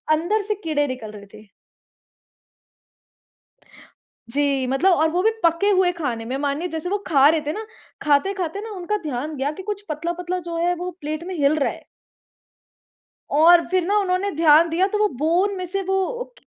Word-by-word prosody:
अंदर 365 +8 0
से - - +1
कीड़े 290 -3 0
निकल 240 -5 -6
रहे 205 -1 -11
थे। 215 0 -14 2.8
जी, 275 0 +1
मतलब 270 +9 +2
और 320 -1 +3
वो 355 +2 0
भी 445 - +4
पके 335 +4 +3
हुए 370 -2 +3
खाने 250 -10 -4
में 255 +3 -3
मानिए 290 +5 -2
जैसे 320 +1 -4
वो 410 +2 0
खा 280 -4 +5
रहे 320 +1 +2
थे 300 - -1
ना, 435 +4 -6 0.4
खाते-खाते 355 +5 0
न 445 +1 -7
उनका 375 +4 -2
ध्यान 295 +1 -4
गया 270 +2 -1
कि 375 - -9
कुछ 415 0 -5
पतला-पतला 345 +4 -3
जो 335 - -4
है 355 - +2
वो 360 +1 -4
प्लेट 310 +2 -4
में 370 0 -5
हिल 285 +1 +3
रहा 275 - 0
है। - - -14 1.5
और 335 +4 +6
फिर 370 -1 +1
ना 410 +2 +1
उन्होंने 380 0 0
ध्यान 320 +1 +5
दिया 360 +4 +2
तो 420 +1 -2
वो 420 0 +3
बोन 355 +7 +1
में 370 - -4
से 390 +2 -2
वो 385 +7 -2
335 Hz, 180 wpm, -22 LUFS, 290-380 Hz, 2.8 s, और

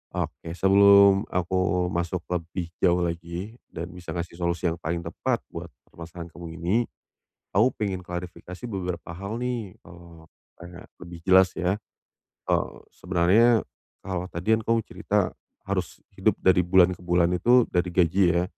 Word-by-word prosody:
Oke - - -4
sebelum 100 +1 +6
aku 90 0 0
masuk 85 0 -2
lebih 85 0 -3
jauh 90 -1 +4
lagi 85 +6 -5
dan 85 +2 -6
bisa 90 -1 -9
ngasih 85 0 -5
solusi 85 0 0
yang 85 - -5
paling 85 +1 -2
tepat - - -2
buat - - -6 0.2
permasalahan 85 0 -9
kamu 85 -1 -9
ini, 85 +5 0 0.8
aku 110 +7 +5
pengen 95 -4 -2
klarifikasi 90 +3 -7
beberapa 90 -4 -4
hal 100 +6 -5
nih, 120 -6 -4
eee, 85 -2 -15 0.4
kayak 85 +1 -11 0.2
lebih 85 -1 -9
jelas 95 -1 +6
ya. 95 +3 0 0.7
Eee, - - +2 0.2
sebenarnya 100 +6 +3 0.4
kalau 90 -2 -3
tadi 90 +6 0
kan - - -5
kamu 115 0 +2
cerita - - 0 0.4
harus - - -3 0.2
hidup - - +3
dari 90 -2 +4
bulan 90 0 +5
ke - - -18
bulan 85 -1 +3
itu 120 +5 +4
dari 90 0 0
gaji 90 +2 +3
ya, 85 +1 +2
90 Hz, 150 wpm, -25 LUFS, 85-95 Hz, 0.8 s, sebelum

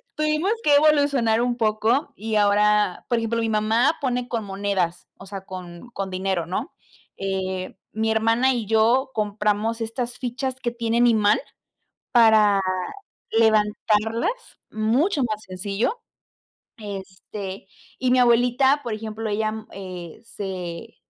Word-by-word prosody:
tuvimos 305 +5 +1
que 290 -1 +5
evolucionar 285 -6 +3
un 240 0 0
poco, 220 +3 +1
y 220 +1 -3
ahora, 210 -1 +3
por 240 - +2
ejemplo, 230 0 -1
mi 225 - 0
mamá 220 +7 +2
pone 250 -3 -1
con 230 -3 -2
monedas, 195 -3 -2
o 195 - -12
sea, 195 0 -7
con 180 +3 -9
con 195 -5 -5
dinero, 185 -2 -1
¿no?, 185 - -4 0.4
eh, 190 -1 -3 0.2
mi 220 +1 0
hermana 225 +4 +3
y 235 -4 -3
yo 230 +5 +3
compramos 215 +1 0
estas 240 +2 -3
fichas 260 +1 -3
que 240 - 0
tienen 235 0 +2
imán 210 -3 +4 0.7
para 215 -4 +5 0.7
levantarlas 220 - +2 0.4
mucho 260 - +1
más 215 -2 -3
sencillo, 200 - -2 0.8
este, 195 -1 -7 0.3
y 255 0 0
mi 255 - +4
abuelita, 245 +4 +4
por 235 -3 -2
ejemplo, 220 0 -5
ella, 215 +1 0
mm, 220 0 -7
eh, 180 -4 -8
se 190 0 -6
220 Hz, 130 wpm, -23 LUFS, 200-240 Hz, 0.8 s, que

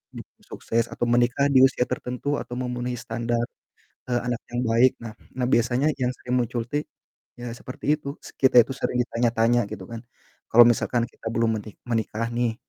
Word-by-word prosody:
jadi - - -7 0.2
sukses 115 0 -1
atau 120 - -2
menikah 120 +3 +3
di 130 - +6
usia 130 -2 +1
tertentu 125 +4 -2
atau 120 - -8
memenuhi 125 0 -3
standar, 115 +1 -2 0.7
eee, 120 -1 +1
anak 125 -1 0 0.2
yang 120 +1 -1
baik. 120 +3 +5
Nah 110 -2 -7 0.2
nah 125 - +1
biasanya 120 +4 +2
yang 125 0 +1
sering 125 0 -2
muncul 120 0 -2
tuh, 145 +2 -2 0.6
ya 120 -1 -5
seperti 135 +5 -2
itu, 140 -1 -6
se - - -10
kita 130 -2 +3
itu 130 - -9
sering 125 - -2
ditanya-tanya, 120 -1 +1
gitu 95 - -6
kan. 115 -1 -6 0.5
Kalo 120 +1 +9
misalkan 120 0 +1
kita - - -10
belum 115 -1 +1
meni 105 +1 -10 0.2
menikah 115 0 -1
nih, 120 -1 0
120 Hz, 180 wpm, -25 LUFS, 115-125 Hz, 0.7 s, Kalo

